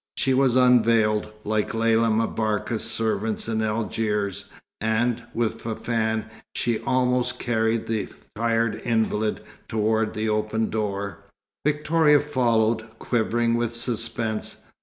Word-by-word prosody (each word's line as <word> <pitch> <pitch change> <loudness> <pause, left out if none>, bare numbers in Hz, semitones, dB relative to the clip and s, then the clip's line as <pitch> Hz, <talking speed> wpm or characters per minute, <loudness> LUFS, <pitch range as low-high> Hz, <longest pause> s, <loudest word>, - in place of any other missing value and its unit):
She 135 - +2
was 130 -2 +3
unveiled, 115 -4 +4
like 110 +1 -1
Lella 115 0 +3
M'Barka's 110 0 0
servants 110 -1 -1
in 110 -1 0
Algiers, 105 -2 -1 0.3
and, 110 +2 +1
with 115 -1 -1
Fafann, 110 -1 -1 0.3
she 120 -2 0
almost 125 -1 +1
carried 115 -1 0
the 110 -2 -2 0.3
tired 115 0 0
invalid 110 -2 0 0.3
towards 110 0 0
the 110 +1 -1
open 110 +1 0
door. 100 -2 -3 0.4
Victoria 150 0 +3
followed, 115 -5 0
quivering 115 0 0
with 120 0 0
suspense. 115 -2 -2
115 Hz, 110 wpm, -24 LUFS, 110-120 Hz, 0.4 s, unveiled